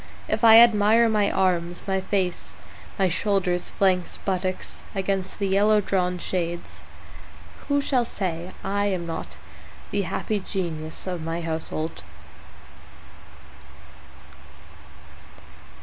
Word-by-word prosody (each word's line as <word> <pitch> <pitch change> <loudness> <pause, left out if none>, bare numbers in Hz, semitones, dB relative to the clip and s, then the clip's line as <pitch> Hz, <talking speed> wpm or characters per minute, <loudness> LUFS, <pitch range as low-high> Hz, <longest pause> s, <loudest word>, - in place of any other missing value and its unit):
If - - -1
I 225 -1 +9
admire 230 0 +6
my 210 -2 +2
arms, 175 -2 0
my 190 -1 0
face, 190 -2 -2 0.4
my 195 - +3
shoulders, 180 -1 0
flanks, 185 -2 +1
buttocks 185 -1 -2 0.2
against 195 -1 -2
the 200 - -1
yellow 205 +2 +4
drawn 180 -2 0
shades, 175 -1 -4 0.9
Who 285 0 +2
shall 260 -3 +1
say 180 -5 -4
I 205 +1 0
am 185 -4 -2
not 165 -1 -6 0.5
the 200 - +1
happy 205 +3 -2
genius 165 -5 -4
of 180 -3 -4
my 165 +1 -3
household? 160 - -4
190 Hz, 105 wpm, -24 LUFS, 175-205 Hz, 0.9 s, I